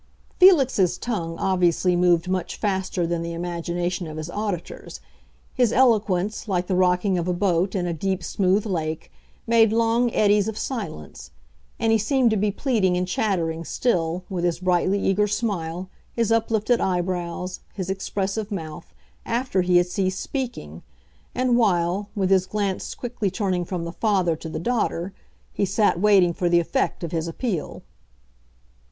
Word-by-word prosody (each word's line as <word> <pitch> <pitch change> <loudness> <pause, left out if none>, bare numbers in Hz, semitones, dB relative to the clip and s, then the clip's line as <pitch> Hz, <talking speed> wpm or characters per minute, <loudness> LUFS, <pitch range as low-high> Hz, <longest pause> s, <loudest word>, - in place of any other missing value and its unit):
Felix's 270 - +5
tongue 170 -9 -3
obviously 180 -1 +2
moved 175 0 +3
much 185 -1 -2
faster 190 -3 -1
than 170 0 -1
the 170 0 -4
imagination 175 +1 -3
of 155 0 -7
his 155 +2 -5
auditors; 205 -4 -5 0.5
his 245 -4 +2
eloquence, 215 -5 +2
like 180 -3 0
the 185 - -1
rocking 180 +1 +2
of 170 - -3
a 180 - +1
boat 185 0 +1
in 180 -2 0
a 175 - -1
deep, 190 +2 -2
smooth 195 +3 +1
lake, 160 -6 -3 0.3
made 225 -2 +4
long 230 +1 +2
eddies 205 -1 +3
of 220 -1 -4
silence. 75 - -6 0.5
And 225 -1 +1
he 225 - +4
seemed 245 +2 +2
to - - +2
be 210 0 +1
pleading 205 -5 +1
and 180 0 -1
chattering 170 -5 -1
still, 175 -4 -1
with 180 -3 -3
his 175 -1 +1
brightly 185 +2 +2
eager 200 +2 +2
smile, 190 -5 -2 0.3
his 230 -2 +1
uplifted 225 +1 +1
eyebrows, 180 0 -2 0.2
his 190 -1 -3
expressive 195 +2 -3
mouth, 160 -4 -7 0.3
after 235 -4 0
he 180 0 +3
had 175 - +4
ceased 185 +1 -2
speaking, 235 - -5 0.5
and 250 -1 +2
while, 190 -1 +1
with 195 -2 0
his 190 -1 +3
glance 200 -2 -2
quickly 240 -5 -3
turning 185 -3 -1
from 175 -1 -4
the 170 - -5
father 185 -4 +1
to 160 +1 -8
the - - -5
daughter, 195 -3 -1 0.4
he - - -1
sat 200 -2 +2
waiting 195 -3 +4
for 175 +1 0
the 175 0 +4
effect 190 +3 -1
of 165 - -4
his 165 -1 -2
appeal. 175 - -4
185 Hz, 160 wpm, -23 LUFS, 175-215 Hz, 0.5 s, Felix's